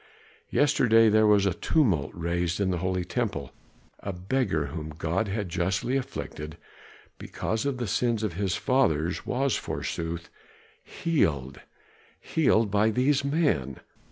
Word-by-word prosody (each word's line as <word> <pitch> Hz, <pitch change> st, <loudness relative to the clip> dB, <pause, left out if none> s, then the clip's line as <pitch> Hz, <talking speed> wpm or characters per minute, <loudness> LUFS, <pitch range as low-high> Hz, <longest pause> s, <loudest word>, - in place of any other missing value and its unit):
Yesterday 115 Hz, -6 st, +4 dB
there 110 Hz, 0 st, +4 dB
was 105 Hz, -2 st, +4 dB
a 95 Hz, -, +2 dB
tumult 95 Hz, -, +1 dB
raised 85 Hz, +1 st, -1 dB
in 95 Hz, -2 st, +1 dB
the 90 Hz, -, -1 dB
holy 90 Hz, 0 st, -1 dB
temple, 100 Hz, -, -3 dB, 0.5 s
a 100 Hz, -, -4 dB
beggar 90 Hz, -, -1 dB
whom 80 Hz, -2 st, -5 dB
God 85 Hz, +7 st, -2 dB
had 100 Hz, 0 st, -2 dB
justly 95 Hz, +8 st, -1 dB
afflicted 85 Hz, -, -5 dB, 0.6 s
because 110 Hz, +5 st, -3 dB
of 140 Hz, -2 st, -1 dB
the 125 Hz, -, -2 dB
sins 115 Hz, +1 st, 0 dB
of 105 Hz, -5 st, -1 dB
his 95 Hz, +1 st, -1 dB
fathers 85 Hz, -, +1 dB
was, 135 Hz, 0 st, +1 dB
forsooth, 85 Hz, +1 st, -4 dB, 0.5 s
healed; 75 Hz, -, -1 dB, 0.6 s
healed 115 Hz, -9 st, +2 dB
by 105 Hz, +2 st, +3 dB
these 130 Hz, +5 st, +2 dB
men. 140 Hz, -, 0 dB
100 Hz, 130 wpm, -27 LUFS, 85-125 Hz, 0.6 s, Yesterday